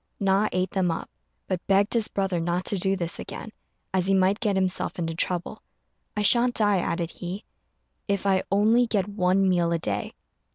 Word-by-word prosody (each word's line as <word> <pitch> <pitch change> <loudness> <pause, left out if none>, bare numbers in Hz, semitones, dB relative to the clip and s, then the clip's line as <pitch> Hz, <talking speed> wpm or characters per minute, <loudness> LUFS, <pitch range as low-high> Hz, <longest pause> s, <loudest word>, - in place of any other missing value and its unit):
Na 195 +1 +2
ate 185 +1 -1
them 185 -2 +1
up; 165 - -4 0.3
but 180 -2 -3
begged 195 +2 +3
his 230 -3 +2
brother 195 -3 -1
not 175 +2 -1
to - - -1
do 190 +1 +1
this 170 -3 -3
again, 220 - -7 0.4
as 185 -1 +1
he 195 - +3
might 190 +2 +2
get 210 -3 0
himself 185 -1 -1
into 165 -2 -2
trouble. 180 +5 -1 0.6
"I 210 - +1
shan't 240 +3 +4
die," 205 -3 +3
added 170 -1 -2
he, 185 +4 -6 0.6
"if 200 -1 -1
I 190 -1 +3
only 220 +5 +4
get 205 -4 0
one 195 -1 +1
meal 175 -2 +2
a 170 - +2
day." 105 -10 -2
190 Hz, 190 wpm, -25 LUFS, 180-205 Hz, 0.6 s, shan't